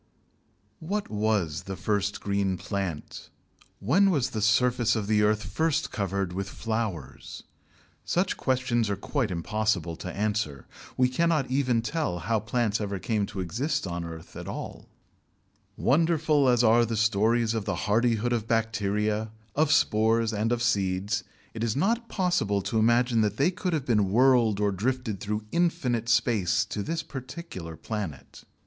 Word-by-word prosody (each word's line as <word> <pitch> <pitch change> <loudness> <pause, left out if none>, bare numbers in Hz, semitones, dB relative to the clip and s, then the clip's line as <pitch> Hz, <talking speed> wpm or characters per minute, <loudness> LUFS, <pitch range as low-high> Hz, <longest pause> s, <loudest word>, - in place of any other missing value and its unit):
What 200 +6 -3
was 105 -7 0
the 95 - -5
first 100 0 -1
green 100 -2 0
plant? 95 -4 -5 0.5
When 180 - +3
was 145 -9 +1
the 110 - -3
surface 120 +2 +3
of 110 -2 -1
the 105 0 +2
earth 105 0 +2
first 160 -2 0
covered 100 -2 -2
with 95 +1 -3
flowers? 105 - -4 0.6
Such 185 +2 0
questions 125 -4 0
are 100 - 0
quite 125 +5 -2
impossible 90 -1 -1
to 90 - -6
answer. 100 - -2 0.3
We 125 - +4
cannot 150 0 +1
even 130 -4 +1
tell 145 - -1
how 110 +6 0
plants 110 0 -1
ever 100 -1 -2
came 105 +1 -1
to 100 -2 -5
exist 135 - -2
on 85 -1 -3
the 85 - -5
earth 80 -1 -10
at - - -7
all. - - -7 0.9
Wonderful 155 -2 +3
as 120 -1 +3
are 115 +1 +5
the 115 -1 -2
stories 110 +2 +2
of 110 -3 -2
the - - -1
hardihood 115 +2 +2
of 115 -2 -2
bacteria, 110 -1 0 0.3
of 155 0 +2
spores, 115 -3 +3
and 110 +2 0
of 120 -1 0
seeds, 100 -2 0 0.3
it 115 - -4
is 115 -2 0
not 230 - 0
possible 175 - 0
to 105 +3 0
imagine 120 +1 +3
that 105 -1 0
they 155 +7 +3
could 180 -1 -3
have 150 -5 -1
been 105 -6 +2
whirled 120 -3 +4
or 105 -1 +2
drifted 115 +1 -2
through 105 +2 -3
infinite 140 -10 0
space 110 -4 +2
to 105 0 -4
this 165 +9 -3
particular 130 - -8
planet. 90 - -6
110 Hz, 155 wpm, -27 LUFS, 100-125 Hz, 0.9 s, are